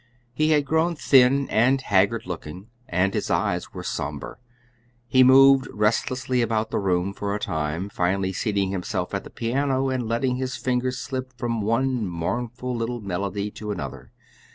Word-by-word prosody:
He 155 Hz, 0 st, +1 dB
had 150 Hz, -2 st, +3 dB
grown 160 Hz, +4 st, +1 dB
thin 135 Hz, -1 st, +4 dB
and 130 Hz, +5 st, +3 dB
haggard 105 Hz, -1 st, +1 dB
looking, 90 Hz, +4 st, -7 dB, 0.2 s
and 90 Hz, +3 st, +1 dB
his -, -, -2 dB
eyes -, -, 0 dB
were -, -, -7 dB
somber. -, -, -5 dB, 0.7 s
He 130 Hz, +1 st, +5 dB
moved 135 Hz, +1 st, +7 dB
restlessly 125 Hz, +4 st, 0 dB
about 110 Hz, -1 st, 0 dB
the -, -, 0 dB
room 95 Hz, -1 st, 0 dB
for 100 Hz, 0 st, -3 dB
a -, -, -3 dB
time, 80 Hz, +2 st, -2 dB
finally 95 Hz, 0 st, -1 dB
seating 100 Hz, -1 st, -1 dB
himself 95 Hz, -2 st, -3 dB
at -, -, -2 dB
the -, -, -11 dB
piano 135 Hz, +3 st, 0 dB
and 125 Hz, -3 st, -2 dB
letting 125 Hz, +2 st, 0 dB
his 130 Hz, -1 st, -3 dB
fingers 125 Hz, 0 st, -1 dB
slip 130 Hz, -1 st, -5 dB
from 115 Hz, -2 st, -2 dB
one 115 Hz, +1 st, 0 dB
mournful 120 Hz, +9 st, -3 dB
little 120 Hz, +1 st, -3 dB
melody 100 Hz, +1 st, -3 dB
to 105 Hz, 0 st, -8 dB
another. 100 Hz, -4 st, -6 dB
115 Hz, 160 wpm, -24 LUFS, 100-130 Hz, 0.7 s, moved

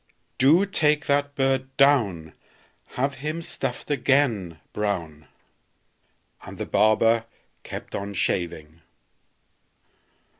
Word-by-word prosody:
Do 155 Hz, +9 st, +5 dB
take 150 Hz, -6 st, +1 dB
that 145 Hz, 0 st, 0 dB
bird 135 Hz, -1 st, -1 dB
down; 110 Hz, -, +3 dB, 0.6 s
Have 135 Hz, +2 st, 0 dB
him 155 Hz, +3 st, -3 dB
stuffed 135 Hz, -1 st, -4 dB
again, 120 Hz, -, +1 dB
Brown!" 85 Hz, -8 st, -3 dB, 1.1 s
And -, -, -10 dB
the -, -, -4 dB
barber 115 Hz, +1 st, +3 dB, 0.4 s
kept -, -, -8 dB
on 100 Hz, 0 st, -5 dB
shaving. 85 Hz, -3 st, -2 dB
125 Hz, 90 wpm, -24 LUFS, 95-145 Hz, 1.1 s, Do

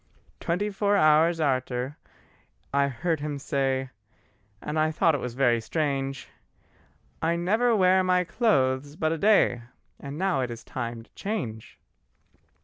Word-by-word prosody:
Twenty 200 Hz, +5 st, -1 dB
four 205 Hz, +1 st, +1 dB
hours 160 Hz, +1 st, +4 dB
arter, 130 Hz, -2 st, -1 dB, 0.8 s
I 140 Hz, 0 st, +3 dB
heard 160 Hz, +5 st, -2 dB
him 145 Hz, -1 st, -4 dB
say, 135 Hz, -2 st, -1 dB, 0.7 s
And 150 Hz, +6 st, -3 dB
I 155 Hz, 0 st, +3 dB
thought 160 Hz, +1 st, +2 dB
it 145 Hz, -, -2 dB
was 125 Hz, -1 st, -5 dB
very 120 Hz, -3 st, +2 dB
strange: 135 Hz, 0 st, -2 dB, 0.9 s
"I 165 Hz, +1 st, +1 dB
never 220 Hz, +8 st, +2 dB
wear 185 Hz, -1 st, +4 dB
my 180 Hz, 0 st, +2 dB
clothes 145 Hz, -, +1 dB
but 155 Hz, 0 st, 0 dB
a 165 Hz, -, -1 dB
day 200 Hz, -, +3 dB, 0.4 s
And 140 Hz, +1 st, -7 dB
now 185 Hz, -6 st, +1 dB
it 125 Hz, -, -2 dB
is 115 Hz, -1 st, -8 dB
time 115 Hz, -2 st, -5 dB
to -, -, -26 dB
change. 145 Hz, -, -5 dB
150 Hz, 140 wpm, -26 LUFS, 130-180 Hz, 0.9 s, hours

